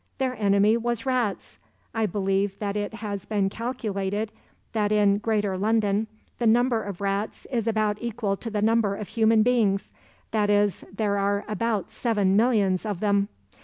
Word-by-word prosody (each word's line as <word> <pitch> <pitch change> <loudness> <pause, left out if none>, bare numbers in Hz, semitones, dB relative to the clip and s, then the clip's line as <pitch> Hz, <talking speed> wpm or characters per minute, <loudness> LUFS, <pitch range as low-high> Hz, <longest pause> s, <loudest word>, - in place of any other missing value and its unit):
Their 260 -2 -1
enemy 205 +1 +3
was 235 +1 -2
rats. 250 -6 -1 0.3
I 225 -1 +1
believe 195 0 0
that 200 -1 -3
it 210 +1 -3
has 205 -2 -5
been 200 -3 +1
calculated 215 -3 -3 0.4
that 210 -2 +1
in 205 -1 +3
'greater 205 -3 0
London' 215 0 +1 0.3
the 235 - +2
number 235 0 +3
of 200 -2 -7
rats 200 +2 -2
is 235 -3 -1
about 215 -2 +1
equal 220 -4 -1
to 230 - -6
the 210 -1 -1
number 220 -2 +2
of 200 -2 -7
human 220 -1 +4
beings, 220 -5 +1 0.4
that 210 -2 +1
is, 205 -1 +2
there 200 0 0
are 200 +1 0
about 215 -2 -1
seven 205 -5 +1
millions 205 -5 +3
of 205 -5 -3
them. 200 -1 +2
210 Hz, 165 wpm, -25 LUFS, 200-225 Hz, 0.4 s, human